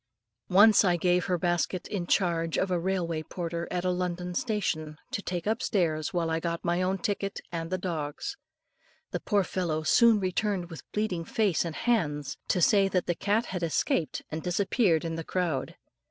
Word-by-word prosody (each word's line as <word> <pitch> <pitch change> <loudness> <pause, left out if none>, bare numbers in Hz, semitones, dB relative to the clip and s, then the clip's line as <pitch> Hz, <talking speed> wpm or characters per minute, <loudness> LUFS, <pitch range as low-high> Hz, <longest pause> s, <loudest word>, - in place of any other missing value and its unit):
Once 205 +3 +7
I 180 -3 +3
gave 180 +1 +2
her 180 - +1
basket 175 +1 -1
in 185 -5 -3
charge 170 -4 +1
of 190 - 0
a 180 - +2
railway 170 -3 -1
porter 170 +1 -4
at 180 0 -2
a 180 - +2
London 180 0 -2
station, 175 -8 -2
to - - -2
take 180 -3 -4
upstairs 185 - 0
while 170 -2 0
I 160 - +1
got 170 +1 -3
my 175 +1 +1
own 185 +1 +1
ticket 200 +1 -2
and 165 -1 -4
the 185 - -1
dog's. 170 - -4 0.8
The - - -2
poor 205 -3 +1
fellow 170 -4 -2
soon 230 +6 +5
returned 185 -1 -1
with 165 - -10
bleeding 210 -5 -1
face 200 -1 +1
and 165 -3 -5
hands, 150 - 0
to 180 - +2
say 200 0 +5
that 185 -2 0
the 175 - +1
cat 205 +6 0
had 180 -2 -4
escaped 165 0 0
and 160 +1 -3
disappeared 180 -1 +1
in 165 0 -3
the 165 - -4
crowd. 165 -6 -2
180 Hz, 185 wpm, -28 LUFS, 165-195 Hz, 0.8 s, Once